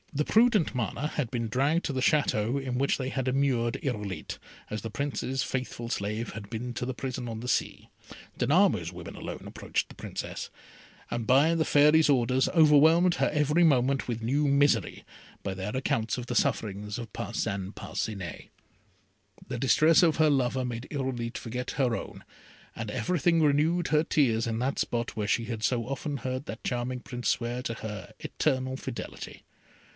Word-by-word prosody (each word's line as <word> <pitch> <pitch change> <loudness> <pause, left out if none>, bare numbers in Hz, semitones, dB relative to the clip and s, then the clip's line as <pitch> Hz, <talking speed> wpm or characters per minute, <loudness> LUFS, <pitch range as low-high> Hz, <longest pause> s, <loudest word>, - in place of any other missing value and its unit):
The 150 +1 0
prudent 225 -5 +4
Mana 125 +4 -1
had 150 -5 -2
been 115 -2 -2
dragged 140 +9 +1
to 145 - -2
the 130 - -1
Château 135 -3 +2
in 130 -2 -3
which 140 - +2
they 130 -1 -3
had 130 -1 -2
immured 130 -3 +1
Irolite, 105 - -4 0.3
as 105 -1 -4
the 115 - -5
Prince's 135 +1 -2
faithful 125 -2 -4
slave 105 +1 -3
had 100 -1 -8
been 120 +2 -4
to 120 - -3
the 130 - -2
prison 125 -1 -4
on 110 -1 -5
the 120 - -6
sea. - - -1 0.5
Danamo's 145 - +3
women 85 -1 -9
alone - - -7
approached - - -3
the - - -14
Princess, - - -6 0.6
and 120 -1 -2
by 140 +7 +4
the 160 - +2
Fairy's 150 +1 +5
orders 130 -1 +3
overwhelmed 160 +2 +5
her 135 - +2
every 150 +3 +3
moment 135 -3 +3
with 115 -2 -3
new 145 +5 +1
misery, 140 -6 +2 0.4
by 95 - -2
their 95 +5 -4
accounts 115 -4 0
of 125 - -5
the 125 - -4
sufferings 105 -2 0
of 115 -4 -7
Parcin 95 0 -3
Parcinet. 100 -5 -5 1.0
The - - -4
distresses 155 +6 +5
of 165 -3 +3
her 155 -1 +4
lover 130 -1 +1
made 120 +1 -5
Irolite 130 -5 -3
forget 125 +2 -4
her 125 -4 +1
own, - - -8 0.5
and 110 -1 -5
everything 170 +3 +1
renewed 155 +4 +2
her 150 0 +3
tears 120 -9 +2
in 115 0 -2
that 130 +3 -1
spot 120 0 -2
where 105 -2 -2
she 115 +1 +1
had 115 -2 -5
so 115 +1 +1
often 140 +2 -3
heard 130 +2 -4
that 110 - -7
charming 125 +1 -2
Prince 125 -1 -3
swear 120 +1 -1
to 115 -2 -3
her 105 -5 -7
eternal 130 -3 -1
fidelity. - - -7
125 Hz, 175 wpm, -28 LUFS, 115-145 Hz, 1.0 s, Fairy's